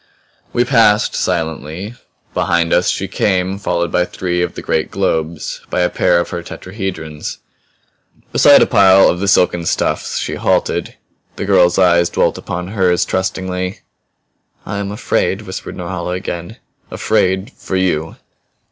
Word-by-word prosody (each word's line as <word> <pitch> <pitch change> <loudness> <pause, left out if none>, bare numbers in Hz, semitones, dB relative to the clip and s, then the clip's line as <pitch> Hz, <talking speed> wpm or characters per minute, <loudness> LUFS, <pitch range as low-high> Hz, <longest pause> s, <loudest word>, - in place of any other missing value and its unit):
We 120 - +1
passed, 115 -5 +3
silently; 80 - -3 0.4
behind 85 -1 +1
us 90 0 +3
she 95 - -1
came, 95 0 0
followed 85 -3 -1
by 90 - +2
three 90 -1 -2
of 90 - -2
the - - -7
great 80 - 0
globes, 80 0 -2
by - - 0
a 90 - +1
pair 90 -1 +3
of 85 - -3
her 85 - -3
tetrahedrons. 90 -5 -6 0.9
Beside 145 - +7
a - - +3
pile 95 -4 +6
of 90 - -1
the 100 - -1
silken 90 -3 +3
stuffs - - -1
she - - -3
halted. - - 0 0.4
The - - -4
girl's 90 -3 +4
eyes 85 -2 +4
dwelt - - 0
upon 90 +1 -5
hers 95 -4 +2
trustingly. 95 0 -3 0.8
"I 100 0 -4
am 100 0 -3
afraid!" 105 - -1
whispered - - -7
Norhala 90 0 -4
again. 90 +2 -5 0.3
"Afraid 95 +5 0
for 95 - -6
you!" 80 -4 0
90 Hz, 145 wpm, -17 LUFS, 85-95 Hz, 0.9 s, Beside